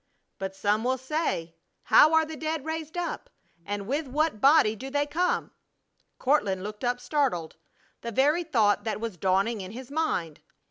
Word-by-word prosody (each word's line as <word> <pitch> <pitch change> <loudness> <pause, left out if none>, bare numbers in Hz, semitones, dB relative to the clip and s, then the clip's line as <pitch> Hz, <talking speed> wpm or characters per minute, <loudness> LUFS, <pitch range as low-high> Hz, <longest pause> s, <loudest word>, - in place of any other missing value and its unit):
"But 195 0 -4
some 210 +2 +1
will 260 +1 +1
say, 260 - -2 0.3
How 310 - +6
are 320 0 +4
the 315 0 -7
dead 315 -1 -3
raised 320 +1 -5
up? 350 -1 -4 0.4
And 205 0 -3
with 285 +6 -2
what 295 -4 0
body 275 -6 +5
do 265 +5 -7
they 285 +1 0
come?" 345 +5 -1 0.7
Courtland 205 -9 +1
looked 210 +2 -7
up, 245 0 0
startled. 245 - -1 0.5
The 235 - -5
very 295 +9 +2
thought 220 - +2
that 220 -1 -2
was 225 -3 -4
dawning 195 +5 +1
in 190 +2 -8
his 255 +2 -9
mind! 185 - -2
255 Hz, 170 wpm, -27 LUFS, 205-310 Hz, 0.7 s, How